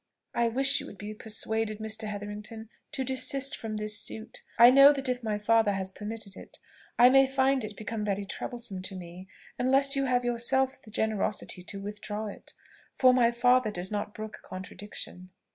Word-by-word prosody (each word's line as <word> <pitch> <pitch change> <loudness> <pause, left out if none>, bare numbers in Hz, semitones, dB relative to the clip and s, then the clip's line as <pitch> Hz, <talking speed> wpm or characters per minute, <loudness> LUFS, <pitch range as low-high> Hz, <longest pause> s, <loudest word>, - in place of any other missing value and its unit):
"I 235 0 +2
wish 270 +4 +2
you - - -8
would 200 - -11
be 210 +1 -6
persuaded, 220 0 -2
Mr. 220 0 -3
Hetherington, 210 +2 -7 0.2
to 265 - -1
desist 265 +1 0
from 220 -1 -5
this 210 0 +2
suit. 220 +1 -5 0.2
I 240 +1 +9
know 275 +2 +9
that 275 -2 -3
if 250 -1 -1
my 215 -2 -1
father 220 0 +3
has 190 -1 -3
permitted 210 0 -7
it, - - -12 0.4
I 245 +1 +8
may 270 +1 +6
find 265 -1 +2
it 215 -1 -7
become 215 0 -4
very 200 -1 -1
troublesome 220 -2 -5
to 190 +1 -6
me, 180 +1 -9 0.3
unless 270 +2 +3
you 275 0 +1
have 250 -1 +1
yourself 260 +3 +1
the - - -14
generosity 215 -3 -1
to 195 +2 -6
withdraw 210 +1 -5
it; 205 - -9 0.4
for 255 -1 +6
my 245 -2 +4
father 245 0 +3
does 185 -1 -5
not 205 0 -3
brook 215 0 -7
contradiction." 185 -1 -8
220 Hz, 180 wpm, -29 LUFS, 205-250 Hz, 0.4 s, I